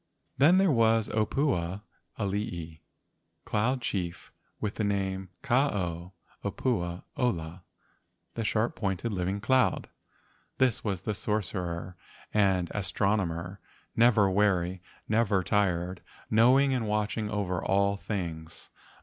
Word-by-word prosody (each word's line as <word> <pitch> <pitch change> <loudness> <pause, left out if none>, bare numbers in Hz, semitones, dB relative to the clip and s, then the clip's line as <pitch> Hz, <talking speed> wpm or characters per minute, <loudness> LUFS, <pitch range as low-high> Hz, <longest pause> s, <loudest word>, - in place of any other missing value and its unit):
Then 160 +7 +6
there 190 -3 +4
was 115 -3 +3
the - - -8
opua 105 - 0 0.3
alii, 95 -6 -3 0.6
cloud 125 +5 0
chief 90 -6 -3 0.3
with 105 -1 -2
the 110 - 0
name 95 -2 -1
Ka 135 +1 +3
ao 90 -2 -4 0.3
opua 95 -4 -1
ola 90 -8 -2 0.7
(the 115 - -3
sharp 110 +2 0
pointed 100 +2 -2
living 95 +2 -1
cloud). 125 +4 +2 0.7
This 130 -4 +2
was 100 -5 -2
the 105 - -2
sorcerer 90 -4 -3 0.4
and 95 -4 +2
as¬ 100 -2 -2
tronomer, 95 -2 -1 0.4
never 115 -3 +5
weary, 95 -2 +1 0.3
never 110 -4 +2
tired, 90 -3 0 0.3
knowing 130 +5 +5
and 120 -4 -1
watching 105 0 -1
over 95 -4 -2
all 100 +1 +2
things. 85 -6 -6
100 Hz, 115 wpm, -29 LUFS, 90-110 Hz, 0.7 s, Then